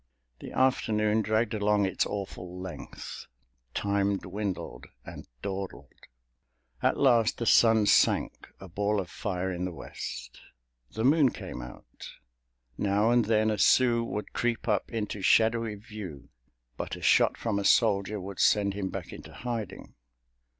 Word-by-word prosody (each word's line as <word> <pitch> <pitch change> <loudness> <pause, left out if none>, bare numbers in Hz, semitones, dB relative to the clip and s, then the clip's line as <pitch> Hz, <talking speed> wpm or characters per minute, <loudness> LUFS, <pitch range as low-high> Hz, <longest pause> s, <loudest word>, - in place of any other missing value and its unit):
The - - -9
afternoon 110 -4 +2
dragged 110 +1 0
along 105 -1 +2
its 95 - 0
awful 90 -3 -6
length. 95 -1 -8 0.5
Time 100 0 +1
dwindled 95 0 -5 0.2
and - - -10 0.2
dawdled. 95 -1 -5 0.9
At - - +2
last 120 -5 +3
the 115 - -3
sun 110 -1 +5
sank, - - +2
a 95 - -10
ball 100 +4 0
of 90 -3 -5
fire 95 -2 -3
in 90 0 -4
the 90 - -2
West. - - -8 0.5
The 110 - -4
moon 145 0 +5
came 65 - -7
out. - - -11 0.7
Now 105 +3 +2
and 120 -2 +3
then 110 0 +2
a 105 - -2
Sioux 120 +2 +4
would 105 -2 -5
creep 120 -1 -1
up 105 -3 0
into 105 -3 -3
shadowy 110 +2 +3
view, 100 - -9 0.5
but - - -4
a - - -11
shot - - +4
from 110 -3 -1
a - - -2
soldier 105 -1 +3
would 95 0 -8
send 100 -2 +3
him 100 -1 -3
back - - -6
into - - -11
hiding. 115 -4 -6
105 Hz, 145 wpm, -28 LUFS, 95-115 Hz, 0.9 s, sun